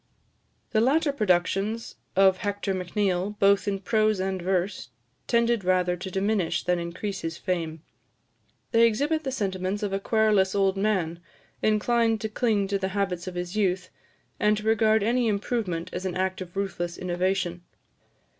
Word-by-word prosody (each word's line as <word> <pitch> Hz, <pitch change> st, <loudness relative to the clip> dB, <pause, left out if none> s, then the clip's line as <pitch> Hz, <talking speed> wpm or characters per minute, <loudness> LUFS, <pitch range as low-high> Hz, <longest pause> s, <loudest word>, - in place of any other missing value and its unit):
The 220 Hz, -, +3 dB
latter 290 Hz, +5 st, +3 dB
productions 205 Hz, +1 st, 0 dB, 0.2 s
of 190 Hz, 0 st, +5 dB
Hector 205 Hz, 0 st, -2 dB
Macneill, 190 Hz, +1 st, -1 dB
both 200 Hz, 0 st, +3 dB
in 200 Hz, -1 st, 0 dB
prose 215 Hz, +1 st, +1 dB
and 190 Hz, -1 st, -2 dB
verse, 185 Hz, -4 st, -1 dB, 0.4 s
tended 235 Hz, -2 st, +2 dB
rather 180 Hz, -1 st, +2 dB
to 180 Hz, +2 st, -6 dB
diminish 195 Hz, -1 st, 0 dB
than 180 Hz, -1 st, +1 dB
increase 185 Hz, +3 st, -4 dB
his 165 Hz, 0 st, -4 dB
fame. 165 Hz, -3 st, -3 dB, 0.9 s
They 230 Hz, 0 st, +6 dB
exhibit 290 Hz, +8 st, 0 dB
the 265 Hz, -, -2 dB
sentiments 195 Hz, -4 st, -2 dB
of 200 Hz, -1 st, -2 dB
a 195 Hz, -, 0 dB
querulous 210 Hz, -3 st, +2 dB
old 195 Hz, -1 st, +2 dB
man, 190 Hz, -5 st, 0 dB, 0.4 s
inclined 225 Hz, +1 st, +2 dB
to 220 Hz, -, -2 dB
cling 215 Hz, -3 st, +1 dB
to 200 Hz, 0 st, 0 dB
the 190 Hz, -, -1 dB
habits 180 Hz, -3 st, -1 dB
of 185 Hz, -, -5 dB
his 175 Hz, +1 st, -4 dB
youth, 185 Hz, -3 st, 0 dB, 0.5 s
and 210 Hz, 0 st, +3 dB
to 210 Hz, -, -5 dB
regard 220 Hz, -1 st, +3 dB
any 240 Hz, +2 st, +2 dB
improvement 200 Hz, -5 st, -2 dB
as 180 Hz, -, -4 dB
an 185 Hz, -2 st, -3 dB
act 185 Hz, 0 st, -1 dB
of 180 Hz, +1 st, -8 dB
ruthless 175 Hz, -3 st, -3 dB
innovation. 180 Hz, 0 st, -1 dB
195 Hz, 155 wpm, -26 LUFS, 180-215 Hz, 0.9 s, They